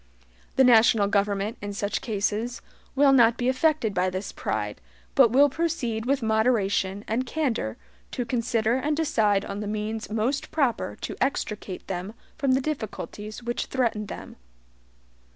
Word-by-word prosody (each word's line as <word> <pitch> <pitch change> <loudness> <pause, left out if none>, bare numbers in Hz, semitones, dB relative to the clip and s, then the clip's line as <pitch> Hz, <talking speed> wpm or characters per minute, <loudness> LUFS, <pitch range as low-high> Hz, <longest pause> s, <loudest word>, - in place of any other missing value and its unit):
The 265 - +5
national 225 -3 +6
government, 200 +1 0
in 205 0 -5
such 200 +1 -2
cases, 220 +2 -2 0.3
will 275 0 +5
not 235 -3 +5
be 245 - -1
affected 260 -4 +1
by 185 0 +1
this 185 +2 -4
pride, 105 -1 -3 0.3
but - - +6
will 275 +5 +6
proceed 255 -8 -2
with 275 -2 +1
moderation 215 -3 +1
and 230 +4 0
candor 245 - -2 0.3
to 245 - -3
consider 230 -1 +1
and 295 +3 -1
decide 215 -11 +2
on 200 0 -5
the 210 - -4
means 215 +1 -3
most 225 +6 -1
proper 270 -8 0
to - - -4
extricate 210 -8 -2
them 190 +4 -5 0.2
from 275 -4 +1
the 265 - +2
difficulties 220 -5 -5
which 240 0 -2
threaten 230 -5 -1
them. - - -9
225 Hz, 150 wpm, -26 LUFS, 205-260 Hz, 0.3 s, national